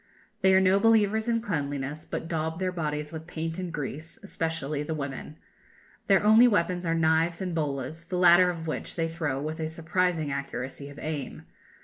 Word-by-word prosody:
They 190 0 +5
are - - +7
no 190 +1 +4
believers 220 0 +3
in 230 -1 +1
cleanliness; 145 -6 -3
but - - -5
daub 160 -1 -2
their 185 0 -1
bodies 150 -3 -3
with 160 0 -8
paint 165 0 -4
and 180 -2 -4
grease, 155 +1 -6
especially 160 -6 -3
the 155 +2 -3
women. 140 +1 -6 0.7
Their 195 -1 +4
only 220 +4 +7
weapons 180 -4 +1
are 165 - +1
knives 165 +1 +2
and 185 -2 -3
bolas, 150 0 -3
the 180 +1 -3
latter 180 0 +6
of 165 -2 -4
which 155 - -4
they 165 -1 0
throw 160 -5 -2
with 155 +3 -4
a 160 - -1
surprising 160 -1 -1
accuracy 140 0 -5
of 145 - -12
aim. 150 -3 -5
165 Hz, 185 wpm, -27 LUFS, 150-180 Hz, 0.7 s, are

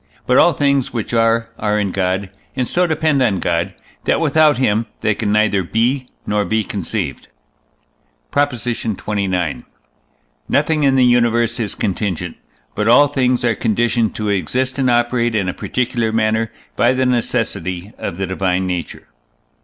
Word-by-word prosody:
But 125 - +4
all 175 - +5
things 140 -2 +1
which 115 -1 -4
are, 115 0 +2
are 105 0 0
in 100 -2 -1
God, 95 +1 -1 0.2
and 130 -2 -1
so 180 0 +1
depend 155 -3 +1
on 105 -7 +2
God, 85 -1 -1 0.3
that - - +2
without 155 -2 +4
him 115 -3 +1
they 110 - +2
can 105 0 -2
neither 105 -2 +2
be 120 +8 0 0.2
nor 105 0 0
be 110 +1 0
conceived. 100 -4 -4 1.0
PROP. 145 0 +2
XXIX. 100 - -2 0.9
Nothing 150 +1 +2
in 135 -1 +4
the 130 -1 +5
universe 120 -1 +2
is 105 -4 -2
contingent, 90 -3 -2 0.4
but 105 +1 -1
all 140 +5 +6
things 125 -3 +1
are 120 - +3
conditioned 115 +1 0
to 105 -1 -2
exist 130 - -1
and 130 -2 +2
operate 120 -1 +1
in 100 -3 0
a 90 - -1
particular 120 -2 -1
manner 110 0 0 0.2
by 120 +2 +3
the 130 0 +1
necessity 105 -6 -1
of 85 - -4
the 95 - -1
divine 95 0 -1
nature. 90 -2 -4
115 Hz, 155 wpm, -18 LUFS, 100-125 Hz, 1.0 s, all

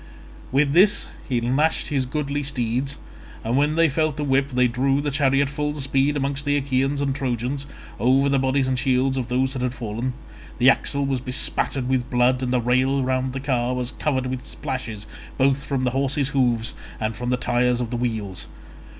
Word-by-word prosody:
With 140 +1 +2
this 195 +5 +4 0.2
he 125 -2 +1
lashed 135 +7 +1
his 135 -3 0
goodly 145 +1 -2
steeds, 135 0 -1 0.5
and 115 +2 -1
when 145 +3 +2
they 165 0 +5
felt 155 0 0
the 150 - -2
whip 135 0 +2
they 125 -1 +3
drew 135 +3 +1
the 145 0 -1
chariot 140 0 +2
full 150 +1 -3
speed 135 +2 +1
among 140 0 -1
the 145 0 +1
Achaeans 135 +1 0
and 140 -1 0
Trojans, 130 +1 -2 0.3
over 130 +5 +3
the 140 -1 +2
bodies 135 0 +1
and 130 -1 0
shields 130 +1 +2
of 130 -3 -2
those 130 +1 0
that 130 - -4
had 125 0 -1
fallen: 120 +3 -3 0.4
the 130 +2 +7
axle 140 0 -1
was 135 -2 -1
bespattered 130 0 -1
with 125 -1 0
blood, 125 +1 +2
and 125 -1 -1
the 125 - +2
rail 130 +3 +2
round 130 0 0
the 135 - -3
car 125 -2 0
was 125 -1 -2
covered 130 -4 -1
with 130 0 -4
splashes 115 -5 -5 0.3
both 135 0 +3
from 135 -3 -2
the 125 - +1
horses' 135 +1 0
hoofs 120 -4 +1 0.3
and 110 0 -2
from 125 0 -4
the 125 - +1
tyres 125 0 +1
of 120 -1 -3
the - - -2
wheels. 110 -6 -3
130 Hz, 195 wpm, -23 LUFS, 125-140 Hz, 0.5 s, the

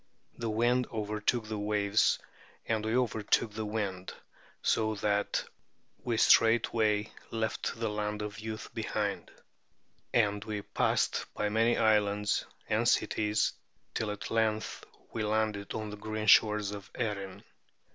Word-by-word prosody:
The 115 -1 -3
wind 120 +3 +2
overtook 110 +1 -1
the 110 -1 -3
waves 105 0 +2 0.5
and 110 -1 0
we 110 +2 0
overtook 110 -2 +1
the 110 0 -4
wind, 100 -4 -3 0.5
so 110 -1 +2
that 105 0 0 0.6
we 120 -2 -1
straightway 110 -2 +4 0.2
left 110 0 -2
the 115 - 0
Land 105 0 -2
of 105 +1 -6
Youth 110 0 -6
behind; - - -2 0.8
and 105 -3 +2
we 105 -2 -4
passed - - 0
by 105 - 0
many 115 +2 +3
islands 105 -1 +2 0.2
and - - +2
cities 105 0 +1 0.4
till 110 - -1
at 105 0 -5
length 110 -1 0 0.3
we 115 - -2
landed 105 -1 -1
on 110 -1 -4
the 105 - -7
green 110 +1 -4
shores 105 -2 +5
of 100 -1 -8
Erin. 100 -5 -3
105 Hz, 130 wpm, -31 LUFS, 105-110 Hz, 0.8 s, shores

